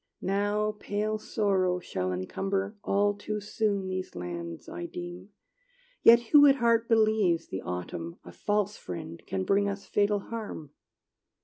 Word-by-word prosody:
Now 205 +2 0
pale 215 +1 -2
Sorrow 195 -4 +1
shall 95 - -3
encumber 195 - -2
All 205 +1 +2
too 210 +1 -4
soon 205 -1 -1
these 185 - -4
lands, 85 -1 -6
I 175 - -5
deem; 175 +2 -8 0.7
Yet 235 +1 +8
who 290 -1 +9
at 275 - +6
heart 235 -2 +2
believes 215 -7 +3
The 95 - -4
autumn, 85 -1 -5
a 90 - -11
false 205 - -1
friend, 85 -2 -7
Can 95 -1 -1
bring 200 - +2
us 200 0 -5
fatal 205 0 +2
harm? 210 -10 -6
200 Hz, 140 wpm, -29 LUFS, 165-210 Hz, 0.7 s, who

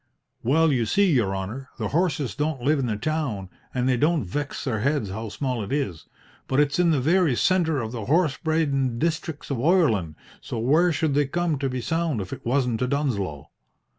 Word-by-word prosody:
"Well, 155 +6 +3
you 120 -4 +1
see, 200 - +3
your 105 -7 +1
honour, 110 +8 -5
the - - -2
horses 155 -5 0
don't 150 -3 -2
live 150 +2 +3
in 130 - 0
the 105 -2 -1
town, 115 - -2 0.2
an' 125 -1 -1
they 130 -1 +2
don't 155 +3 +2
vex 140 +10 -4
their 115 -6 -1
heads 135 -4 0
how 110 +2 -5
small 125 +1 -2
it 100 - -7
is. 115 - -2 0.4
But 135 - +1
it's 145 +2 +2
in 175 -1 +4
the 155 -4 +3
very 160 0 +3
centre 165 -2 +2
of 110 -2 -4
the 115 -4 -5
horse 155 - +2
bradin' 140 -6 0
districts 160 0 -2
of 135 - 0
Oireland, 120 - +2 0.3
so - - -5
where 155 +10 +3
should 155 -1 0
they 145 0 +2
come 170 -1 -1
to 135 -1 -1
be 125 -1 -3
sould 160 0 -1
if 95 -2 -5
it - - -8
wasn't 125 -2 +1
to 125 - 0
Dunsloe?" 110 - -2
140 Hz, 205 wpm, -25 LUFS, 115-155 Hz, 0.4 s, in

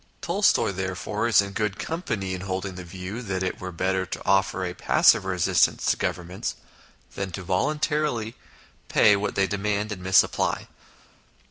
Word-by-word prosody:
Tolstoy, 190 - +2
therefore, 95 +4 -2
is 110 -3 +5
in 100 - -6
good 105 -1 -2
company 110 - -3
in 90 - -5
holding 95 0 -3
the 90 0 -8
view 95 +6 -7
that 95 -5 -3
it 95 - -3
were 95 0 -5
better 95 +2 0
to - - -6
offer 95 -1 +2
a 90 - -4
passive - - +4
resistance - - +2
to - - +1
Governments 90 +1 -3 0.6
than 95 -1 -4
volun 95 - -1
tarily 150 -8 0
to - - -30 0.5
pay 105 -1 +5
what 100 +1 -2
they 100 - +3
demand 105 +1 -2
and 95 -3 -5
misapply. 95 +1 +2
95 Hz, 160 wpm, -25 LUFS, 95-110 Hz, 0.6 s, is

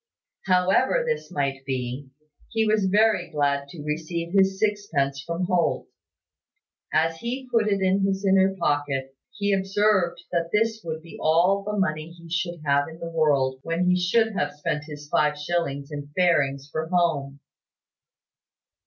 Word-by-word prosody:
However 190 - +3
this 475 -1 -2
might 140 -4 -2
be, 130 0 -4 0.4
he 225 -1 +1
was 215 -2 +2
very 205 -2 +3
glad 140 -2 0
to 150 +1 -9
receive 165 +3 -3
his 195 -1 +3
sixpence 165 -11 0
from 170 +3 -3
Holt. 180 -1 +1 1.1
As 165 +1 +1
he 255 +6 -4
put 225 -2 +2
it 200 -2 +1
in 190 +1 +2
his 195 0 0
inner 190 0 +4
pocket, 145 -5 -1 0.2
he 205 -3 -1
observed 195 -2 +2
that 170 -1 0
this 225 +1 +1
would 160 -1 -5
be 170 - -11
all 180 +5 +3
the 210 +1 -3
money 155 -5 -1
he 170 -1 -14
should 170 -1 -2
have 140 0 +2
in 160 0 -10
the 170 0 -6
world 140 -5 +2
when 165 +4 -1
he - - +4
should 220 +5 +2
have 145 -7 -2
spent 150 0 -3
his 150 -1 -9
five 150 0 +2
shillings 150 -3 -2
in 145 -1 -6
fairings 140 -6 +2
for 160 0 -2
home. 160 -6 0
170 Hz, 155 wpm, -25 LUFS, 145-195 Hz, 1.1 s, inner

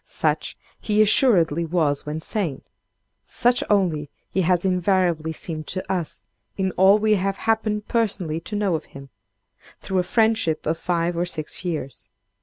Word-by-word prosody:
Such - - -1 0.2
he 210 -1 0
assuredly 190 - +4
was 155 -4 0
when 155 +2 -4
sane. 170 - 0 0.6
Such 245 +1 +2
only 170 -8 +1 0.2
he 190 - +1
has 180 +1 +1
invariably 180 -3 +1
seemed 155 -1 -6
to 185 0 -3
us, 175 -4 -4 0.3
in 190 -1 0
all 190 +3 +5
we 215 0 +2
have 195 0 0
happened 215 -1 -1
personally 195 -9 0
to 210 +5 -7
know 205 -3 0
of 160 - -2
him, 135 0 -11 0.7
through 190 -1 -1
a - - +2
friendship 220 -6 +1
of 165 +1 -1
five 175 -1 -1
or 175 +1 -1
six 155 0 -4
years. 155 -7 -5
180 Hz, 155 wpm, -23 LUFS, 160-205 Hz, 0.7 s, all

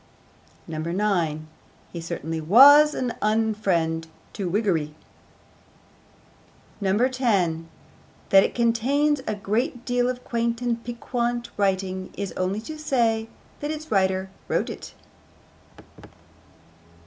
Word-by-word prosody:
9. 165 -1 -1 0.5
He 170 - -5
certainly 165 -1 -4
was 285 - +7
an 245 -2 -2
unfriend 205 -7 0 0.3
to 195 -5 -3
Whiggery. 170 -7 0 1.9
10. 200 -6 +1 0.6
That 195 0 +7
it - - -2
contains 265 +5 +2
a 215 - -1
great 235 +5 -2
deal 245 0 +1
of 250 0 -5
quaint 235 0 -1
and 235 -2 -2
piquant 240 0 -3
writing 190 -2 -1
is 200 -2 -3
only 185 +3 -2
to 310 +6 -8
say 230 -6 0 0.3
that 295 - -4
its 310 0 -6
writer 190 -1 +1 0.2
wrote - - 0
it. - - -10
215 Hz, 100 wpm, -24 LUFS, 185-245 Hz, 1.9 s, was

